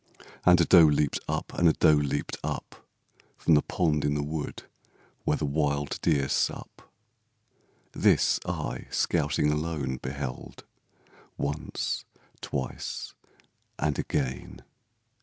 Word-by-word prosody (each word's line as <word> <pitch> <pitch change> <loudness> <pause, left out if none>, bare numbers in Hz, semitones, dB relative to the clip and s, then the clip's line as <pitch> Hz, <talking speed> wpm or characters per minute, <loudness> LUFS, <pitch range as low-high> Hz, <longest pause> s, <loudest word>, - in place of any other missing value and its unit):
And 90 0 +7
a 85 - +4
doe 85 -2 +8
leaped 75 -1 +1
up, - - -3
and 85 - +3
a - - +3
doe 80 - +5
leaped 75 -2 0
up - - -6 0.5
From 80 - +2
the 75 - +6
pond 75 -4 0
in 75 - +1
the 75 - -1
wood 75 +1 -5 0.6
where 75 - +2
the 75 - -2
wild 70 -1 -1
deer 70 -1 +2
sup. - - -2 1.0
This - - +3
I, - - -4
scouting 75 - +1
alone, 75 -4 -2
beheld, 65 0 -6 0.7
Once, 75 +2 -3 0.4
twice 65 -2 -4 0.6
and 75 -1 -1
again! 65 -1 -3
75 Hz, 120 wpm, -28 LUFS, 70-75 Hz, 1.0 s, doe